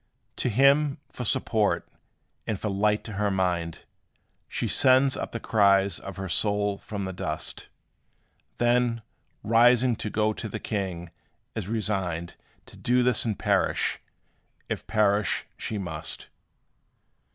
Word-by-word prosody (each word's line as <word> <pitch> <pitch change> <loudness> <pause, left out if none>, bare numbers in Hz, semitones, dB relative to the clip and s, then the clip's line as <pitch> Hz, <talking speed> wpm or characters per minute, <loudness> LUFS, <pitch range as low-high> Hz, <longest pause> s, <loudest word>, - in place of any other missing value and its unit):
To - - 0
him, 140 +5 +4
for 125 - -6
support, 105 -1 +1 0.6
and 105 -4 -2
for 105 - -2
light 105 +2 +1
to 115 - -8
her 105 +1 0
mind, 90 -4 -1 0.7
She - - -2
sends 130 +1 +4
up - - -4
the 115 - -4
cries 100 -4 +3
of 95 -2 -8
her 95 0 -4
soul 100 +2 +1
from 100 -2 -5
the 95 - -4
dust; - - -4 0.9
Then, 120 -1 +2 0.4
rising 120 +2 +4
to 105 - -3
go 110 +1 +1
to 110 - -6
the - - -4
king, 90 -5 -4 0.4
is 110 -5 -4
resigned 95 -6 -2 0.3
To - - -15
do 125 +1 +2
this 125 -2 +3
and 110 -5 -1
perish, - - +1 0.7
if - - -4
perish 105 -2 +2
she 110 - -4
must. 80 -5 -4
105 Hz, 135 wpm, -26 LUFS, 95-115 Hz, 0.9 s, him